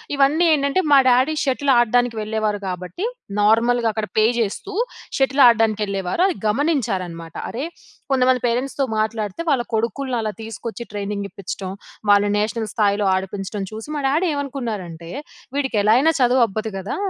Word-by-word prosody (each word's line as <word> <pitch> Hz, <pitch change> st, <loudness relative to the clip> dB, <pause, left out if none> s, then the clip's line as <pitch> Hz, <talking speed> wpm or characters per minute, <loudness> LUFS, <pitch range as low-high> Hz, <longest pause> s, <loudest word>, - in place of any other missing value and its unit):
ఇవన్నీ 290 Hz, +5 st, +3 dB
ఏంటంటే, 280 Hz, +4 st, +1 dB
మా -, -, +9 dB
డాడీ 260 Hz, +5 st, +3 dB
షటిల్ 275 Hz, +1 st, +1 dB
ఆడడానికి 240 Hz, 0 st, +2 dB
వెళ్ళేవారు. 215 Hz, -1 st, -1 dB
కాబట్టి, 180 Hz, -, -4 dB, 0.4 s
నార్మల్‍గా 230 Hz, +3 st, +3 dB
అక్కడ 215 Hz, 0 st, -3 dB
పే 215 Hz, -, +5 dB
చేస్తూ, 230 Hz, -, -3 dB, 0.5 s
షటిల్ 270 Hz, +1 st, +4 dB
ఆడడానికి 225 Hz, -2 st, +3 dB
వెళ్ళేవారు. 195 Hz, -, -2 dB
అది 375 Hz, -, -1 dB
గమనించారన్నమాట. 210 Hz, -, -1 dB, 0.2 s
అరే, 250 Hz, +4 st, -4 dB, 0.5 s
కొంతమంది 255 Hz, -1 st, +3 dB
పేరెంట్స్‌తో 260 Hz, +4 st, -1 dB, 0.2 s
మాట్లాడితే, 215 Hz, -, -2 dB
వాళ్ళ 265 Hz, -3 st, +2 dB
కొడుకుల్ని 245 Hz, +3 st, -1 dB
అలా 215 Hz, -1 st, -3 dB
తీసుకొచ్చి, 225 Hz, +2 st, -6 dB
ట్రైనింగ్ 200 Hz, 0 st, -3 dB
ఇప్పించడం. 190 Hz, 0 st, -6 dB, 0.4 s
వాళ్ళు 205 Hz, 0 st, +5 dB
నేషనల్ 215 Hz, +1 st, -2 dB
స్థాయిలో 205 Hz, -2 st, +1 dB
ఆడిపించడం 195 Hz, +2 st, -4 dB
చూసి, 220 Hz, +3 st, -7 dB
మా -, -, -2 dB
డాడీ 310 Hz, +7 st, +1 dB
ఏమనుకున్నారంటే, 220 Hz, -, -5 dB, 0.5 s
"వీడికి 265 Hz, -4 st, -1 dB
ఎలా 215 Hz, +1 st, +5 dB
అయినా 310 Hz, +5 st, +4 dB
చదువు 250 Hz, 0 st, +4 dB
అబ్బదు 215 Hz, +2 st, -4 dB
కదా! 195 Hz, +5 st, -4 dB
225 Hz, 145 wpm, -21 LUFS, 205-265 Hz, 0.5 s, మా